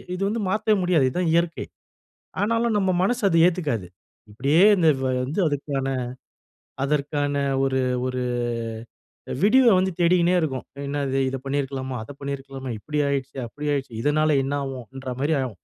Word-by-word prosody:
இது 185 Hz, -, -6 dB
வந்து 225 Hz, +2 st, -2 dB
மாத்தவே 215 Hz, +1 st, +2 dB
முடியாது. 170 Hz, -7 st, +3 dB
இதுதான் 175 Hz, +3 st, 0 dB
இயற்கை. 170 Hz, 0 st, +1 dB, 0.8 s
ஆனாலும் 230 Hz, +1 st, +1 dB
நம்ம 190 Hz, -2 st, +1 dB
மனசு 245 Hz, +5 st, 0 dB
அது 165 Hz, -, +2 dB
ஏத்துக்காது. 150 Hz, -, -1 dB, 0.4 s
இப்படியே 140 Hz, -, +2 dB
இந்த 170 Hz, -4 st, +3 dB, 0.4 s
வந்து 150 Hz, +9 st, -2 dB
அதுக்கான 140 Hz, -2 st, -2 dB, 1.0 s
அதற்கான 145 Hz, 0 st, 0 dB, 0.3 s
ஒரு 135 Hz, -1 st, +1 dB, 0.3 s
ஒரு 130 Hz, 0 st, -2 dB, 1.2 s
விடிவை 255 Hz, +5 st, +5 dB
வந்து 190 Hz, +1 st, +1 dB
தேடிக்கினே 175 Hz, +1 st, +4 dB
இருக்கும். 135 Hz, -5 st, -2 dB, 0.2 s
என்ன 145 Hz, 0 st, -2 dB
இது 135 Hz, +1 st, 0 dB
இதை 135 Hz, -, -3 dB
பண்ணியிருக்கலாமா? 135 Hz, -2 st, -3 dB
அதை -, -, -14 dB
பண்ணியிருக்கலாமா? 135 Hz, -1 st, -6 dB
இப்படி 150 Hz, +8 st, -4 dB
ஆயிடுச்சே, 135 Hz, -1 st, -3 dB
அப்படி 150 Hz, +5 st, -5 dB
ஆயிடுச்சே. 135 Hz, -4 st, -3 dB
இதனால 155 Hz, 0 st, +2 dB
என்ன 140 Hz, +2 st, -2 dB
ஆகும்? 135 Hz, -2 st, -5 dB
அப்டின்ற 130 Hz, +1 st, -7 dB
மாரி 150 Hz, +3 st, +1 dB
ஆகும். 115 Hz, -8 st, -5 dB
145 Hz, 145 wpm, -24 LUFS, 135-175 Hz, 1.2 s, விடிவை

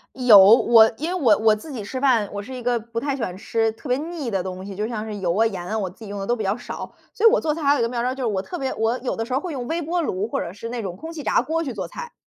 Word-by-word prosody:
有， 245 Hz, -6 st, +8 dB
我， 220 Hz, +3 st, +7 dB
因 315 Hz, +4 st, -3 dB
为 -, -, -2 dB
我 220 Hz, -7 st, +5 dB
我 220 Hz, 0 st, +5 dB
自 295 Hz, +7 st, -10 dB
己 230 Hz, -5 st, -5 dB
吃 260 Hz, +6 st, -5 dB
饭， 245 Hz, -7 st, +2 dB
我 205 Hz, -, -4 dB
是 255 Hz, +5 st, -8 dB
一 250 Hz, -, -7 dB
个 240 Hz, 0 st, +1 dB
不 230 Hz, +1 st, -5 dB
太 280 Hz, 0 st, -2 dB
喜 -, -, -6 dB
欢 185 Hz, -6 st, -3 dB
吃 225 Hz, +3 st, 0 dB
特 250 Hz, +5 st, -10 dB
别 250 Hz, -, +2 dB
腻 305 Hz, -4 st, -5 dB
的 195 Hz, -2 st, 0 dB
东 185 Hz, 0 st, -6 dB
西， 200 Hz, -, -7 dB
就 210 Hz, +3 st, -3 dB
像 220 Hz, -2 st, -4 dB
是 215 Hz, -1 st, -6 dB
油 180 Hz, -3 st, -1 dB
啊， 220 Hz, +2 st, +3 dB
盐 190 Hz, -5 st, -3 dB
啊， 220 Hz, -, -2 dB
我 195 Hz, -4 st, -2 dB
自 220 Hz, +5 st, -13 dB
己 -, -, -9 dB
用 200 Hz, 0 st, -6 dB
的 -, -, -3 dB
都 240 Hz, -, +1 dB
比 -, -, -4 dB
较 195 Hz, +1 st, 0 dB
少。 245 Hz, -, -7 dB, 0.2 s
所 455 Hz, 0 st, +4 dB
以 -, -, +9 dB
我 -, -, +2 dB
做 310 Hz, -2 st, 0 dB
菜 325 Hz, -, -6 dB
还 280 Hz, 0 st, +5 dB
有 290 Hz, -, 0 dB
一 -, -, +1 dB
个 230 Hz, -, +1 dB
妙 240 Hz, -1 st, -2 dB
招， 250 Hz, +2 st, -1 dB
就 265 Hz, -, -5 dB
是 -, -, +1 dB
我 200 Hz, -4 st, -1 dB
特 355 Hz, -, -7 dB
别 265 Hz, -4 st, -2 dB
我 225 Hz, +2 st, 0 dB
有 250 Hz, -, -2 dB
的 225 Hz, -, -2 dB
时 250 Hz, -, -5 dB
候 265 Hz, -, +1 dB
会 360 Hz, -, -5 dB
用 255 Hz, -5 st, -5 dB
微 335 Hz, +4 st, -2 dB
波 340 Hz, +3 st, -1 dB
炉 200 Hz, -, -2 dB
或 -, -, -1 dB
者 170 Hz, -, -5 dB
是 230 Hz, +3 st, -7 dB
那 240 Hz, 0 st, -4 dB
种 190 Hz, -4 st, -5 dB
空 320 Hz, -, -8 dB
气 325 Hz, -2 st, -7 dB
炸 -, -, +2 dB
锅 325 Hz, +1 st, -2 dB
去 260 Hz, -, -4 dB
做 -, -, -4 dB
菜。 485 Hz, -1 st, -8 dB
235 Hz, 385 characters per minute, -23 LUFS, 210-275 Hz, 0.2 s, 以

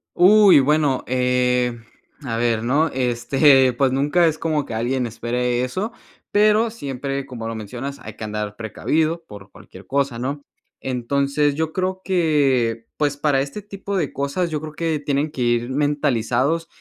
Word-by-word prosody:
Uy, 200 Hz, -2 st, +7 dB
bueno, 145 Hz, -2 st, +1 dB
eh, 125 Hz, -1 st, +1 dB, 0.4 s
a 115 Hz, -3 st, -3 dB
ver, 115 Hz, -1 st, 0 dB
¿no?, 145 Hz, +7 st, +2 dB
este, 130 Hz, +2 st, +3 dB
pues 130 Hz, +1 st, +1 dB
nunca 145 Hz, +6 st, +2 dB
es 155 Hz, -1 st, 0 dB
como 155 Hz, -3 st, -1 dB
que 115 Hz, -, -7 dB
alguien 125 Hz, +3 st, -1 dB
espere 120 Hz, +2 st, -1 dB
eso, 190 Hz, -, -3 dB, 0.4 s
pero 215 Hz, +2 st, +4 dB
siempre, 140 Hz, -, -4 dB
como 115 Hz, -3 st, -6 dB
lo 115 Hz, -, -4 dB
mencionas, 125 Hz, +6 st, -6 dB
hay -, -, -9 dB
que -, -, -9 dB
andar 105 Hz, -1 st, -4 dB
precavido 155 Hz, +9 st, -1 dB
por 100 Hz, -1 st, -12 dB
cualquier 95 Hz, +1 st, -15 dB
cosa, 140 Hz, -3 st, -1 dB
¿no?, 140 Hz, +4 st, -4 dB, 0.4 s
entonces 140 Hz, +3 st, 0 dB
yo 160 Hz, 0 st, -1 dB
creo 185 Hz, 0 st, -2 dB
que, 135 Hz, -, +1 dB
pues 145 Hz, -1 st, 0 dB
para 145 Hz, -2 st, +2 dB
este 145 Hz, +10 st, -5 dB
tipo 200 Hz, -1 st, -6 dB
de 155 Hz, -6 st, -1 dB
cosas, 140 Hz, +6 st, -1 dB
yo 155 Hz, -2 st, -2 dB
creo 155 Hz, -1 st, -7 dB
que 160 Hz, -2 st, -1 dB
tienen 145 Hz, +1 st, -1 dB
que 130 Hz, -, -6 dB
ir 120 Hz, 0 st, +1 dB
mentalizados 145 Hz, +1 st, 0 dB
140 Hz, 160 wpm, -21 LUFS, 120-155 Hz, 0.4 s, Uy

